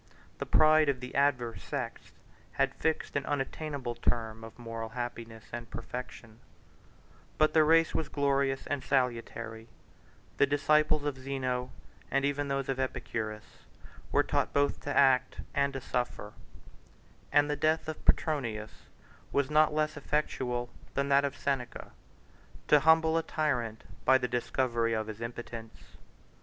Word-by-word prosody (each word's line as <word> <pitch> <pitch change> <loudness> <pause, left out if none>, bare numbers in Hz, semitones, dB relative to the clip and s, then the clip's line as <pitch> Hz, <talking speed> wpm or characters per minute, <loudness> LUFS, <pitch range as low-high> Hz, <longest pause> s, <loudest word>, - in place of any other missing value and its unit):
The - - -3
pride 155 -1 +5
of 135 -2 0
the 125 0 -8
adverse 130 -5 +1
sects - - -5 0.4
had - - +1
fixed 160 0 -1
an 145 - +1
unattainable 140 -2 -3
term 115 -1 -2
of 115 - -11
moral 115 -2 -5
happiness 115 -1 -6
and 120 -1 -6
perfection; 115 -1 -8 1.0
but 155 0 +4
the 160 - +6
race 165 +1 +4
was 160 - -1
glorious 140 -1 +1
and 145 -3 -2
salutary; 115 -3 -1 0.7
the 140 - +5
disciples 150 +1 +3
of 140 -3 -2
Zeno, 130 -2 -2 0.4
and 140 0 +1
even 145 0 0
those 135 -1 -1
of 135 -1 -2
Epicurus, 110 -4 -4 0.5
were - - +4
taught - - 0
both 145 0 +2
to 145 - -3
act 130 -2 +4
and 140 -1 +2
to 135 - -3
suffer; 120 -4 -3 1.0
and 145 0 +5
the 150 - 0
death 155 +2 +1
of 155 - -5
Petronius 115 -9 0 0.4
was 140 0 +1
not 155 0 +5
less 155 0 0
effectual 130 -4 -1 0.2
than 140 0 0
that 140 0 +5
of 140 - -3
Seneca, 135 -3 -3 0.8
to 150 - +7
humble 160 +1 +4
a - - 0
tyrant 125 -9 -1 0.2
by 130 - +6
the 125 -1 -2
discovery 120 -1 0
of 110 -1 -1
his 110 +1 -8
impotence. 115 -1 -8
135 Hz, 145 wpm, -30 LUFS, 120-145 Hz, 1.0 s, to